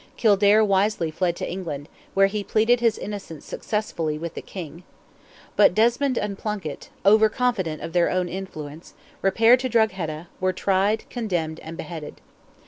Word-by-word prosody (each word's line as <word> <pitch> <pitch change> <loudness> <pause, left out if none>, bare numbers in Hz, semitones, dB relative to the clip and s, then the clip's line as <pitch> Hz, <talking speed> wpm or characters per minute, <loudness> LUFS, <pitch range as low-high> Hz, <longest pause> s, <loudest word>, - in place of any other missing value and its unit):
Kildare 210 0 +5
wisely 195 -4 +1
fled 175 +1 0
to - - -4
England, 155 -6 -5 0.3
where 195 0 +6
he 205 +1 -2
pleaded 225 +4 +3
his 230 -2 +2
innocence 195 -7 -7
successfully 165 -8 -3
with 165 +1 -5
the - - -6
King. 170 -2 -8 0.7
But 205 -3 +5
Desmond 240 +4 +2
and 200 -2 -2
Plunkett, 200 -9 -5 0.2
over 215 +2 +6
confident 210 -10 -1
of 165 - -6
their 175 -1 +3
own 185 -1 0
influence, 165 -4 -8 0.3
repaired 225 +6 +5
to 255 0 -2
Drogheda, 185 -8 0
were 185 0 +1
tried, 195 +3 +1
condemned, 175 -9 -2
and 165 +1 -9
beheaded. 160 -4 -7
195 Hz, 150 wpm, -24 LUFS, 165-215 Hz, 0.7 s, where